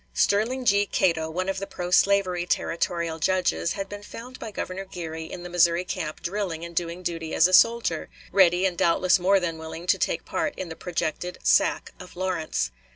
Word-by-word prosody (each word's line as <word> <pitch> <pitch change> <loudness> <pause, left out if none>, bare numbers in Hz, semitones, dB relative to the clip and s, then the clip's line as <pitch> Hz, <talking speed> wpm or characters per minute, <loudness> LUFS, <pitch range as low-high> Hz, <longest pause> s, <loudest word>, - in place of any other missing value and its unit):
Sterling 235 - +1
G. 205 -2 +3
Cato, 160 -3 +1
one 185 +3 -3
of 195 0 -1
the 195 - -5
pro 180 0 -5
slavery 185 -2 +3
territorial 170 -1 -1
judges, 180 0 +1
had 195 -1 -4
been 205 +1 -8
found 245 +4 -10
by 225 - -6
Governor 190 -2 -5
Geary 165 -4 -6
in 175 +2 -8
the - - -6
Missouri 175 0 +3
camp 155 -5 -5
drilling 175 -3 -3
and 170 0 -10
doing 170 +1 -2
duty 165 -2 -3
as 165 - +6
a 185 - -4
soldier, 230 -6 +4 0.2
ready 180 -1 +4
and 185 -2 0
doubtless 180 +2 +3
more 195 +2 +4
than 165 -3 -3
willing 160 +1 -7
to - - +2
take - - -1
part 295 - -2
in 185 - -5
the 165 - -7
projected 180 0 -3
sack - - +2
of 180 0 -12
Lawrence. 165 - -2
180 Hz, 195 wpm, -25 LUFS, 170-195 Hz, 0.2 s, as